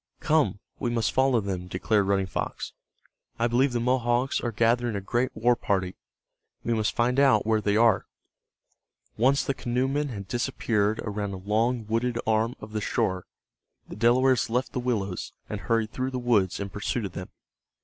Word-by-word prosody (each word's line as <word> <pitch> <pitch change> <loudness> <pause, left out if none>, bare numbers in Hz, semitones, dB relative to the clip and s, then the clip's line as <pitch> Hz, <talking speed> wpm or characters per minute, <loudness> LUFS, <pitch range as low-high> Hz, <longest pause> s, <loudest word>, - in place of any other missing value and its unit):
"Come, 155 -7 +2 0.2
we 120 - -1
must 115 -2 0
follow 130 -3 +3
them," 95 -3 -4
declared 100 +2 +1
Running 100 -1 +2
Fox. 95 - -4 0.6
"I 115 - +1
believe 125 +3 +2
the 120 - -1
Mohawks 125 +1 +1
are 120 - -2
gathering 115 +1 +1
a - - -1
great 120 +6 0
war 120 +3 +3
party. 95 -4 -1 0.7
We 120 - 0
must 110 -1 0
find 125 +3 +2
out 130 -7 +4
where 110 -1 +2
they 105 0 +1
are." 115 -3 +4 1.1
Once 135 +5 +3
the 140 - -1
canoemen 135 +4 -1
had 100 -5 -7
disappeared 110 -3 0
around 105 -2 -3
a - - -5
long 110 +5 0
wooded 115 +2 -1
arm 110 +3 +1
of 110 - -10
the 110 - -1
shore, 95 -2 -1 0.6
the - - -8
Delawares 125 +3 +3
left 125 +3 -1
the - - -1
willows, 105 -7 -2
and - - -5
hurried 115 -2 0
through 130 0 -2
the 130 - -4
woods 115 -7 +1
in 100 0 -4
pursuit 105 +3 -2
of 95 - -5
them. 90 +1 -7
115 Hz, 175 wpm, -26 LUFS, 105-125 Hz, 1.1 s, out